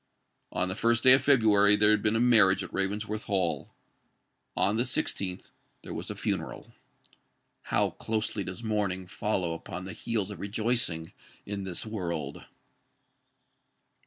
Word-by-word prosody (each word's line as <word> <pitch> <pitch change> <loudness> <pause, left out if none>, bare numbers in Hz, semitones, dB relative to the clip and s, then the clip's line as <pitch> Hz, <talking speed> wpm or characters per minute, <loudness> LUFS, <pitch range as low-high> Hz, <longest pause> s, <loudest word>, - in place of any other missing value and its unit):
On 90 - 0
the 95 - -2
first 115 +3 +1
day 130 - +9
of 130 +1 +8
February 110 -7 +5
there 105 +1 +4
had 105 -1 +3
been 110 +1 +2
a - - +2
marriage 110 -6 +5
at - - -10
Ravensworth 105 +2 -2
Hall: 95 -4 -1 0.9
on 105 +3 +2
the 120 - +2
sixteenth 100 -6 -3 0.3
there - - -7
was - - -6
a - - -5
funeral. - - -4 0.9
How - - +1
closely 110 -2 -2
does 90 +4 -7
mourning 100 -4 -1
follow 90 -2 -2
upon 90 +2 -7
the 95 - -7
heels 110 -4 -2
of 100 - -8
rejoicing, 105 -5 -1 0.3
in 100 -1 -4
this 90 +1 -3
world! 85 -9 -4
105 Hz, 145 wpm, -28 LUFS, 95-110 Hz, 0.9 s, day